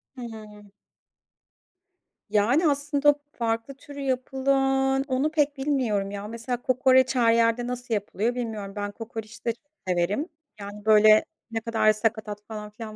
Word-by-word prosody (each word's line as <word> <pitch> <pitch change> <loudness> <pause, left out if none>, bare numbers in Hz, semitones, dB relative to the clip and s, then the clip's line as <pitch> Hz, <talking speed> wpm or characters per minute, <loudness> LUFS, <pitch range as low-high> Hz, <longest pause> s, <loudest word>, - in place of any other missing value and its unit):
Hı 255 - -9
hı. 210 -3 -10 1.6
Yani, 245 +11 +3
aslında 285 0 +2 0.2
farklı 230 +2 -2
türü 285 +1 -12
yapılan 270 0 +1
onu 275 +3 0
pek 295 -2 +1
bilmiyorum 250 -8 0
ya. 200 0 -6
Mesela, 230 +2 -4
kokoreç 260 +1 +3
her 230 -2 +4
yerde 230 +1 +2
nasıl 245 -1 -4
yapılıyor, 215 +3 -1
bilmiyorum. 220 -5 -4
Ben 205 0 -3
kokoreç 225 +1 -9
de 230 - +1
çok 235 - -30 0.2
severim. 185 - 0 0.3
Yani, 205 +1 -9
böyle 215 0 +7 0.3
ne 225 0 -2
kadar 225 -1 +3
sakatat 215 -1 -2
falan 210 -1 -7
filan 215 0 -9
230 Hz, 140 wpm, -26 LUFS, 215-265 Hz, 1.6 s, böyle